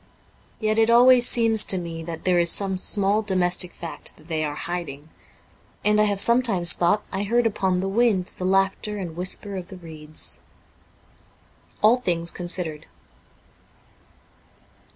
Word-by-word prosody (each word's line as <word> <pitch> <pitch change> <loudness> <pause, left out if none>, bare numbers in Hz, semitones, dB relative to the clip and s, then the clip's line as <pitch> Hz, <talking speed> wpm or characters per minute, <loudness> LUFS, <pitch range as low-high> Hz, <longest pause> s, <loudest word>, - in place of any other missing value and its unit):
Yet 215 0 -1
it 225 0 +2
always 245 +1 +5
seems 225 -2 +4
to 190 - +2
me 165 -2 -7
that 165 0 -8
there 180 -1 +1
is 170 0 +2
some 195 -2 +1
small 200 +2 +1
domestic 180 -3 +1
fact 170 - -7
that 155 +2 -20
they 160 -1 -2
are 145 -1 -4
hiding, 160 -3 -7 0.8
and 210 0 +3
I - - +3
have 205 -2 -1
sometimes 225 -7 +5
thought 180 +5 0
I 190 - -4
heard 235 +4 0
upon 190 -4 -1
the 190 - -3
wind 205 -2 0
the 185 - -4
laughter 195 +2 -1
and 175 -5 -7
whisper 185 +3 -2
of 180 -1 -8
the 190 - -12
reeds. 155 -3 -9 0.7
' - - -34
All 225 +4 +5
Things 170 -8 -3
Considered. 175 -3 -3
190 Hz, 150 wpm, -22 LUFS, 170-210 Hz, 0.8 s, always